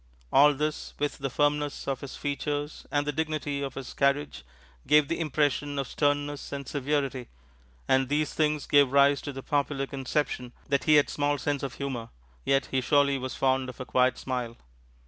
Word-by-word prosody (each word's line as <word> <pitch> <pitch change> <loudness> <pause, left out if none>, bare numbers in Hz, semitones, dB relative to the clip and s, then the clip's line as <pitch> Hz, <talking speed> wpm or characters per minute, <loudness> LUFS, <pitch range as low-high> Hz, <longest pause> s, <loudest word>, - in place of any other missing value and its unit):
All 145 +1 +6
this, 150 +2 -3
with 145 0 -2
the 135 -1 -2
firmness 145 +1 0
of 135 -2 -2
his 140 - -7
features 145 +1 -3
and 145 0 0
the 150 - 0
dignity 150 -2 -2
of 135 -2 -4
his 135 -3 -7
carriage, 140 - 0 0.4
gave 150 -1 +5
the 170 - -2
impression 145 -2 0
of 135 -2 -1
sternness 145 0 -1
and 140 -2 -5
severity. 135 -3 -1 0.6
And 130 -1 +3
these 150 +1 0
things 150 -1 +1
gave 140 -3 +4
rise 140 0 +5
to 145 - -5
the 135 -1 -8
popular 140 -1 0
conception 135 -2 -2 0.2
that 140 -2 +1
he 155 - +6
had 145 - +5
small 145 0 0
sense 145 0 -1
of 135 -3 -4
humor; 130 -5 -4 0.3
yet 135 - +1
he 130 - +1
surely 140 +1 +3
was 130 0 -5
fond 130 -1 +1
of 130 - -10
a 130 - -5
quiet 130 0 +2
smile. 125 -3 -4
140 Hz, 185 wpm, -28 LUFS, 135-145 Hz, 0.6 s, All